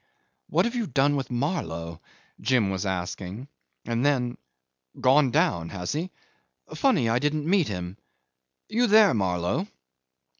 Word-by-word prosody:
"What -, -, +2 dB
have 235 Hz, -, -2 dB
you 235 Hz, -4 st, -2 dB
done 140 Hz, +1 st, +2 dB
with 135 Hz, -3 st, -3 dB
Marlow?" 85 Hz, -, -3 dB, 0.4 s
Jim 120 Hz, -7 st, +2 dB
was 95 Hz, +1 st, -2 dB
asking; 95 Hz, +5 st, -4 dB, 0.4 s
and 115 Hz, +1 st, -1 dB
then, 130 Hz, -4 st, +1 dB, 0.6 s
"Gone 135 Hz, +2 st, +4 dB
down 145 Hz, -, +1 dB
has 90 Hz, -3 st, -4 dB
he? 160 Hz, +6 st, -2 dB, 0.6 s
Funny 250 Hz, -, +2 dB
I 115 Hz, +2 st, +2 dB
didn't 150 Hz, +2 st, -1 dB
meet 185 Hz, -3 st, +3 dB
him.... 90 Hz, 0 st, -5 dB, 0.7 s
You 240 Hz, +2 st, +1 dB
there, 215 Hz, -1 st, +6 dB
Marlow?" 90 Hz, -4 st, -1 dB
125 Hz, 135 wpm, -26 LUFS, 95-155 Hz, 0.7 s, there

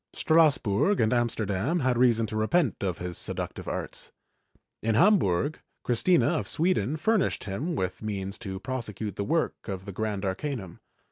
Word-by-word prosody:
Strass 160 Hz, -2 st, +4 dB
burg 110 Hz, -, +1 dB
and 110 Hz, 0 st, +3 dB
Amsterdam 120 Hz, -, 0 dB
had 130 Hz, -1 st, +2 dB
reason 120 Hz, -2 st, +3 dB
to 110 Hz, -, -6 dB
repent 120 Hz, -, +2 dB
of 90 Hz, -4 st, -1 dB
his 90 Hz, -1 st, -4 dB
seductive -, -, -4 dB
arts. -, -, -5 dB, 0.7 s
In 110 Hz, 0 st, +1 dB
Hambiu 145 Hz, -, +4 dB
g, -, -, -20 dB, 0.2 s
Christina 165 Hz, +9 st, +3 dB
of -, -, -5 dB
Sweden 155 Hz, -, +1 dB
furnished 215 Hz, +5 st, +1 dB
him 125 Hz, -, -3 dB
with 90 Hz, -7 st, -3 dB
means 100 Hz, -2 st, -4 dB
to 95 Hz, -4 st, -5 dB
prosecute 110 Hz, -4 st, -4 dB
the 100 Hz, -, -2 dB
work 160 Hz, +9 st, -1 dB
of 95 Hz, -1 st, -5 dB
the 100 Hz, -, -6 dB
Grand 105 Hz, 0 st, -3 dB
Arcanum. 100 Hz, -, -4 dB
110 Hz, 160 wpm, -27 LUFS, 100-150 Hz, 0.7 s, Strass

